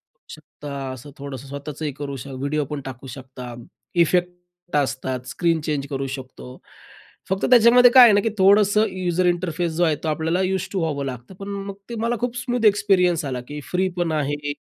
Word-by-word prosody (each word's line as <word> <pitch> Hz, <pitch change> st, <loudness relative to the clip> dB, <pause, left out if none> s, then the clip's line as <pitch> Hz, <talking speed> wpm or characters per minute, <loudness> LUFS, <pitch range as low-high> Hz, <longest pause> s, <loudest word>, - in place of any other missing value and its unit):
करू -, -, -15 dB
शकता 145 Hz, -1 st, -10 dB, 0.2 s
असं 130 Hz, +3 st, -11 dB
थोडंसं 140 Hz, -1 st, -8 dB
स्वतःचंही 145 Hz, +2 st, -5 dB
करू 140 Hz, -1 st, -4 dB
शक 140 Hz, -, -8 dB
व्हिडिओ 145 Hz, +1 st, -1 dB
पण 145 Hz, -2 st, -3 dB
टाकू 130 Hz, 0 st, -8 dB
शकता. 125 Hz, -1 st, -9 dB, 0.4 s
इफेक्ट 175 Hz, 0 st, -1 dB
असतात. 130 Hz, -1 st, -2 dB
स्क्रीन 165 Hz, +2 st, 0 dB
चेंज 145 Hz, -3 st, -2 dB
करू 135 Hz, -1 st, -3 dB
शकतो. 130 Hz, -1 st, -11 dB, 0.7 s
फक्त 190 Hz, 0 st, 0 dB
त्याच्यामध्ये 245 Hz, +1 st, +7 dB
काय 255 Hz, -1 st, +10 dB
आहे 225 Hz, -4 st, +8 dB
ना, 205 Hz, -, +5 dB
की 225 Hz, -, 0 dB
थोडंसं 205 Hz, +2 st, +5 dB
यूजर 185 Hz, -1 st, -1 dB
इंटरफेस 175 Hz, -1 st, -1 dB
जो 175 Hz, +2 st, +1 dB
आहे 160 Hz, -3 st, +3 dB
तो -, -, -2 dB
आपल्याला 160 Hz, +4 st, 0 dB
यूज 190 Hz, 0 st, -1 dB
टू 195 Hz, -, -1 dB
व्हावं 145 Hz, -4 st, -2 dB
लागतं. 125 Hz, +6 st, -7 dB
पण 195 Hz, +1 st, -9 dB, 0.2 s
मग 200 Hz, -, -6 dB
ते 235 Hz, -, -5 dB
मला 235 Hz, +1 st, 0 dB
खूप 245 Hz, 0 st, -2 dB
स्मूथ 245 Hz, -3 st, -1 dB
एक्सपिरियन्स 195 Hz, -6 st, +3 dB
आला, 125 Hz, -3 st, -3 dB
की 150 Hz, 0 st, -6 dB
फ्री 185 Hz, +1 st, +1 dB
पण 175 Hz, -2 st, 0 dB
आहे, 145 Hz, -1 st, -2 dB
165 Hz, 190 wpm, -22 LUFS, 140-190 Hz, 0.7 s, काय